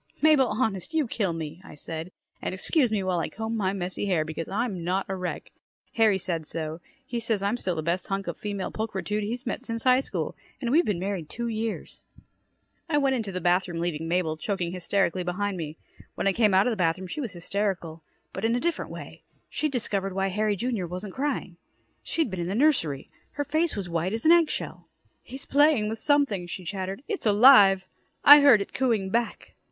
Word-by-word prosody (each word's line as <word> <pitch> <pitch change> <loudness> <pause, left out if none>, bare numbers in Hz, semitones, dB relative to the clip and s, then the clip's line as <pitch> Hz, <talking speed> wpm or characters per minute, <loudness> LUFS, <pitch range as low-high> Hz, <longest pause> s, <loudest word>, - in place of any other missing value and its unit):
"Mabel, 300 -4 +5
honest, 225 - -2
you 310 -3 +3
kill 205 -5 -1
me," 165 +1 -6
I - - -12
said, 160 +3 -5 0.3
"and - - -3
excuse 250 - +2
me 205 -3 0
while 185 -2 0
I 165 - -2
comb 220 +6 -4
my 195 -4 0
messy 185 +1 -3
hair 170 -5 +1
because 160 +1 -5
I'm 200 -4 -2
not 185 +3 0
a 190 - -3
wreck. 180 -1 -5 0.4
Harry 220 -4 +4
said 170 -5 -2
so. 160 0 -4 0.3
He 240 -2 -3
says 225 -3 0
I'm 200 +4 +1
still 185 -7 -2
the 155 - -3
best 170 +3 -1
hunk 195 0 -2
of 170 - -4
female 200 -2 -4
pulchritude 215 -1 -3
he's 240 +5 -4
met 250 - -3
since 230 -3 -4
high 255 0 +5
school 270 - -3 0.2
and 245 -4 -2
we've 330 +5 +4
been 205 - 0
married 185 -4 -3
two 235 0 -4
years!" 220 0 -4 0.9
I 295 - +2
went 275 -2 +2
into 220 -5 -3
the 185 -1 -4
bathroom 175 0 +1
leaving 165 -2 -2
Mabel 165 -2 0
choking 180 0 -2
hysterically 185 0 0
behind 190 +3 -2
me. 160 -2 -6 0.4
When - - -3
I 195 - +3
came 210 -2 +3
out 190 +2 +5
of 250 - +2
the 220 - -2
bathroom, 180 +1 0
she 185 +11 -5
was 230 -8 -5
hysterical 175 -3 -3 0.3
but 190 - -5
in 230 +1 +2
a - - +1
different 340 +4 -2
way. - - -9 0.3
She'd 305 -1 -1
discovered 200 -6 -1
why 195 0 0
Harry, 210 +2 0
Jr., 225 -4 -2
wasn't 185 +3 -6
crying. 270 -11 -3 0.4
She'd 320 -10 -1
been 190 - -4
in 170 - -2
the 190 - -2
nursery. 220 - +1 0.2
Her 290 - -2
face 315 +3 0
was 200 -4 -4
white 170 +3 -1
as 225 +4 -2
an 320 - +7
egg 340 -2 +5
shell. - - -5 0.3
"He's 265 +1 -9
playing 285 -7 +3
with 225 0 -4
something," 275 -12 +1
she 180 +1 -7
chattered. 190 +5 -4
"It's 410 - -2
alive. 205 -4 +7 0.4
I 290 +1 +11
heard 265 -8 +7
it - - -6
cooing 225 -7 0
back." 235 +1 -2
200 Hz, 210 wpm, -26 LUFS, 180-240 Hz, 0.9 s, I